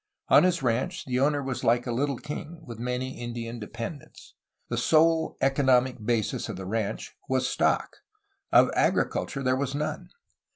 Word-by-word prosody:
On - - +8
his 180 -3 +2
ranch 130 +11 -1
the 125 -1 -1
owner 145 +1 +2
was 130 -1 -4
like 120 +1 +3
a 120 - -2
little 135 +2 0
king, 155 +3 -7
with 115 -3 -9
many 125 +2 -3
Indian 120 0 -5
dependents. 115 +6 -8 0.3
The - - -3
sole 160 0 +3
economic 130 -3 +2
basis 115 -1 -1
of - - -4
the 95 - -7
ranch 110 +1 -3
was 130 -1 +1
stock; - - 0 0.5
of - - +6
agriculture 135 - 0
there 130 0 +2
was 135 +1 -2
none. 150 +1 -3
130 Hz, 160 wpm, -27 LUFS, 120-145 Hz, 0.5 s, On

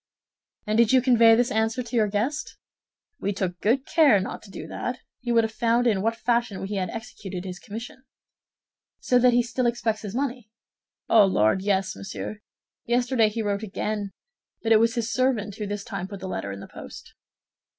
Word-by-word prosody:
"And 215 +1 +1
did 235 -2 +5
you 260 - +6
convey 235 -3 +6
this 245 +1 +1
answer 225 +3 0
to 240 +1 -7
your 220 -2 +3
guest?" 230 +9 -2 0.6
"We 200 - -1
took 185 -3 -3
good 255 +6 +2
care 295 - +5
not 190 - -5
to 205 - -15
do - - -8
that; 250 +1 -4 0.2
he 245 -1 -3
would 230 -1 +4
have 220 - -2
found 235 +2 +2
in 210 -5 +2
what 225 +2 0
fashion 235 -4 0
we 195 +2 -5
had 185 -3 -1
executed 195 -5 -7
his 180 -1 -6
commission." 230 +5 -8 1.0
"So 250 - +3
that 250 0 +5
he 240 0 +4
still 245 +1 -1
expects 230 -2 -1
his 205 0 -6
money?" 250 -4 -3 0.6
"Oh, 215 -3 +6
Lord, 110 - +2
yes, 190 -1 0
monsieur! 205 +2 -6 0.5
Yesterday 245 -2 +2
he 225 +1 -3
wrote 200 -1 -1
again; 210 0 -3 0.5
but 225 - 0
it 220 - +7
was 230 +2 +2
his 230 -1 -2
servant 235 -6 0
who 210 - -4
this 205 0 -4
time 200 -5 -5
put 200 -1 -8
the 190 - -6
letter 100 - -4
in 100 0 -7
the - - -9
post." - - -11
225 Hz, 195 wpm, -25 LUFS, 200-240 Hz, 1.0 s, it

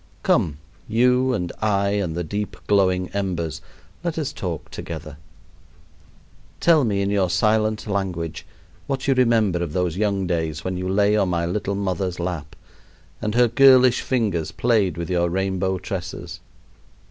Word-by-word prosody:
Come, 75 -3 +2 0.3
you 125 +3 +3
and 90 -8 -2
I 100 -2 +2
and 100 -5 -1
the 85 - -2
deep 100 +5 -4
glowing 95 -2 +2
embers, 90 -7 -3 0.4
let 170 -2 -2
us 155 -4 -2
talk 85 -5 -5
together. 75 -3 -7 1.4
Tell 160 -4 +5
me 100 -3 0
in 100 - -1
your 100 -3 +2
silent 110 +2 +1
language 95 -5 -3 0.4
what 135 -1 -3
you 135 - +5
remember 115 -8 +2
of 85 -4 -3
those 90 -2 -1
young 100 -2 0
days, 80 -3 -2
when 95 0 -2
you 90 +1 -3
lay 100 +2 +3
on 100 -3 +2
my 85 -1 0
little 100 +3 -2
mother's 95 -2 -2
lap 85 -4 -4 0.7
and 105 +1 -2
her 120 0 +5
girlish 130 +1 +6
fingers 100 -11 -1
played 105 -2 +1
with 85 -1 -3
your 85 -1 +1
rainbow 95 +1 -1
tresses. 90 0 -6
95 Hz, 150 wpm, -22 LUFS, 85-110 Hz, 1.4 s, girlish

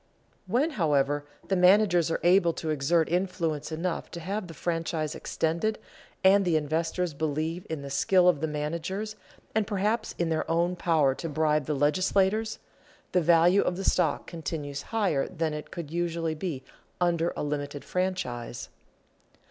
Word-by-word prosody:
When, 255 - +1
however, 145 -1 +1 0.2
the 195 - +1
managers 180 -2 +5
are 165 - -1
able 175 -1 +4
to 160 -1 -3
exert 155 +3 +2
influence 170 -4 -1
enough 165 +2 -3
to 170 - -7
have 195 +3 -3
the 165 - -10
franchise 165 -2 -2
extended, 170 +7 -1 0.5
and 195 +1 +6
the 175 -3 +1
investors 160 +3 -1
believe 155 +3 -2
in 155 -3 -4
the 140 - -7
skill 180 +5 +4
of 165 -6 +3
the 160 - 0
managers 170 +8 -3 0.4
and 215 -2 +1
perhaps 210 +2 -1
in 170 -1 0
their 160 -1 0 0.3
power 160 -6 +2
to 165 +5 -5
bribe 155 -1 +1
the 150 - 0
legislators, 190 +8 +1 0.5
the 180 - +3
value 170 +3 +5
of 180 - -1
the 195 - -4
stock - - +1
continues 150 -4 -5
higher 190 -11 +1
than 160 -1 -2
it 150 0 -6
could 165 -4 -7
usually 170 -1 -1
be 155 -4 -4 0.4
under 170 -1 +1
a - - -2
limited 145 -1 -4
franchise. 130 -11 -3
165 Hz, 155 wpm, -28 LUFS, 150-185 Hz, 0.5 s, and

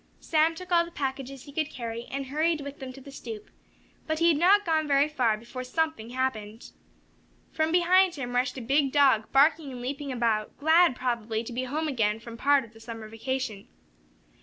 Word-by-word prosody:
Sam 320 +1 +2
took 365 +1 -10
all 340 -1 +5
the 340 - -9
packages 270 -3 -5
he 285 - -12
could 310 0 -1
carry, 235 -3 -6
and 275 0 -4
hurried 310 +3 0
with 280 0 -8
them 265 -2 -7
to 270 - -12
the 280 - -12
stoop. 225 -6 -9 0.6
But 315 0 -1
he 335 +1 +4
had 320 - +3
not 395 +6 +5
gone 315 -2 +1
very 280 0 +4
far 245 -8 +1
before 240 +3 -8
something 315 -3 -2
happened. 230 -4 -3 0.8
From 315 0 0
behind 360 +1 +4
him 245 -4 -5
rushed 250 +1 0
a - - -5
big 275 +3 +1
dog, 265 -7 +3
barking 290 +1 +3
and 250 - -7
leaping 275 +3 -4
about, 230 -4 -1
glad, 320 -1 +4
probably, 235 -3 -2
to 235 - -8
be 255 +2 -2
home 305 +5 -2
again 220 -6 0
from 230 0 -10
part 280 +2 +3
of 230 - -19
the 225 - -16
summer 225 -1 -8
vacation. 225 -2 -4
270 Hz, 200 wpm, -27 LUFS, 235-310 Hz, 0.8 s, all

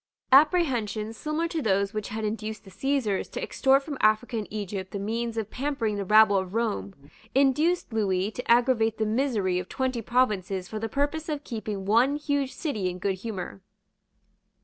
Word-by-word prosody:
Apprehensions 255 - +3
similar 305 +7 -2
to 330 -2 -2
those 200 -2 +1
which 215 -1 -3
had 220 +1 -3
induced 215 0 -4
the 195 - -14
Caesars 225 -1 -1
to - - -5
extort 270 +1 +3
from 285 -2 -6
Africa 215 +3 +2
and 215 -2 -3
Egypt 200 -3 -5
the 205 - -5
means 230 +3 -3
of 220 -2 -3
pampering 255 -6 -1
the 200 - -2
rabble 215 0 +6
of 190 +1 -3
Rome 100 - -1 0.4
induced 290 +3 +2
Lewis 200 -1 0
to 250 - -2
aggravate 235 -2 +3
the 220 - 0
misery 215 -6 0
of 180 - -7
twenty 260 -2 -1
provinces 200 -6 0
for 215 - -5
the 225 +1 -3
purpose 290 +4 -1
of 295 -1 -3
keeping 215 -4 -5
one 235 +7 +3
huge 285 -2 -1
city 215 - -2
in 180 - -6
good 190 +1 -1
humour. 195 -2 -6
220 Hz, 175 wpm, -27 LUFS, 200-270 Hz, 0.4 s, rabble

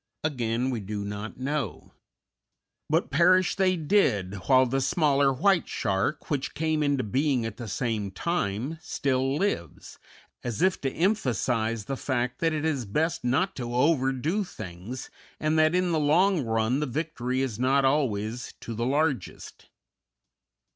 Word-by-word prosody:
Again, 125 -4 -1
we 120 - -2
do 100 0 -5
not 105 +2 -6
know. 135 - -3 1.0
But 160 0 +1
perish 180 +4 +4
they 185 -2 +2
did, 140 - +2
while 130 -1 +6
the 135 +2 0
smaller 140 -2 +3
white 170 +7 +2
shark, 100 +11 -1
which 140 -2 -2
came 155 -1 0
into 145 -3 +1
being 130 +2 +1
at 115 -2 -5
the 120 - -6
same 110 -2 -2
time, 135 - -2
still 135 -5 0
lives, 195 - -3 0.4
as 120 +7 -2
if 190 -1 +2
to 135 - -1
emphasize 120 - 0
the 135 - -3
fact 125 -2 -2
that 165 -1 +2
it 155 0 -2
is 140 -7 0
best 155 +12 -1
not 150 +11 +1
to 120 -2 -4
overdo 140 +6 +1
things, 100 - -8 0.3
and 155 +1 +1
that 155 +2 +4
in 180 -1 +2
the 160 - +2
long 165 +3 +3
run 115 +3 +1
the 150 - -1
victory 130 -2 -2
is 120 -5 -2
not 135 +2 +3
always 125 -4 0
to 115 - -6
the 115 +2 -2
largest. 145 0 -2
135 Hz, 150 wpm, -27 LUFS, 120-155 Hz, 1.0 s, while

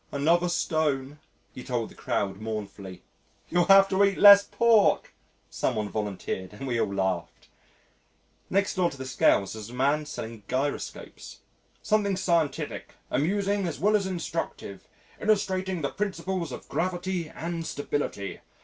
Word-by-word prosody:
"Another 170 +5 +2
stone," 150 -5 -1 0.3
he 125 - -9
told 120 -3 -2
the - - -15
crowd 95 -1 -2
mournfully. 100 -4 -6 0.5
"You'll 175 0 +2
have 195 0 +8
to 195 +1 +3
eat 200 -1 +2
less 200 -1 +9
pork," 230 -2 +3 0.4
some - - -1
one 105 -1 -2
volunteered 100 -2 -4
and 120 +6 -7
we 120 -3 0
all - - -1
laughed. 95 -3 -3 1.0
Next 200 +1 +1
door 180 -2 +1
to 140 - -11
the 130 - -6
Scales 120 -6 +2
was 110 0 -8
a 125 - -10
man 145 +4 +1
selling 115 -6 -7
gyroscopes. 135 +3 -4 0.4
"Something 205 -3 +1
scientific, 165 -6 -1 0.2
amusing 200 +5 0
as 165 - -5
well 210 +6 +3
as 200 -2 +1
instructive, 165 - -5 0.3
illustrating 190 -4 0
the 140 - 0
principles 190 -5 -3
of - - -8
gravity 180 -2 -2
and 165 0 -5
stability. 145 - -3
155 Hz, 140 wpm, -27 LUFS, 115-190 Hz, 1.0 s, less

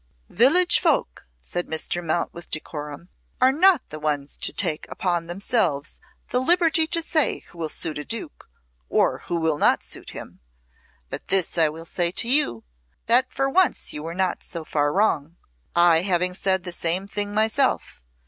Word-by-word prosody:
'" - - -40
"Village 345 - +4
folk," - - -1
said 175 0 -3
Mr. 160 +2 0
Mount 165 +1 -2
with 170 - -8
decorum, 150 +1 -5 0.3
"are 255 +1 +5
not 350 +2 +3
the 155 - -8
ones 145 -2 -2
to - - -1
take 155 - -2
upon 175 -3 -2
themselves 175 - 0 0.3
the 250 - +1
liberty 330 +2 +3
to 335 +1 +1
say 315 -2 +1
who 170 - -16
will 160 -2 -3
suit 155 0 -1
a - - -5
Duke 225 -4 -5 0.4
or - - +1
who 175 - -2
will 160 -3 0
not - - +3
suit - - -6
him. - - -10 0.7
But - - -5
this 190 -3 +2
I 160 -3 +4
will 165 +2 -9
say 175 0 +1
to 230 - +2
you, 245 - +2 0.4
that 250 +3 +2
for 270 +1 -1
once 365 +6 +1
you 150 - -5
were 165 +2 -6
not 185 -1 -1
so 165 -2 -7
far 145 -1 0
wrong; 170 -4 0 0.4
I 170 -1 +5
having 180 -1 0
said 190 0 +1
the 180 - -5
same 170 +2 0
thing 205 0 -2
myself. 220 - 0
175 Hz, 175 wpm, -23 LUFS, 160-240 Hz, 0.7 s, are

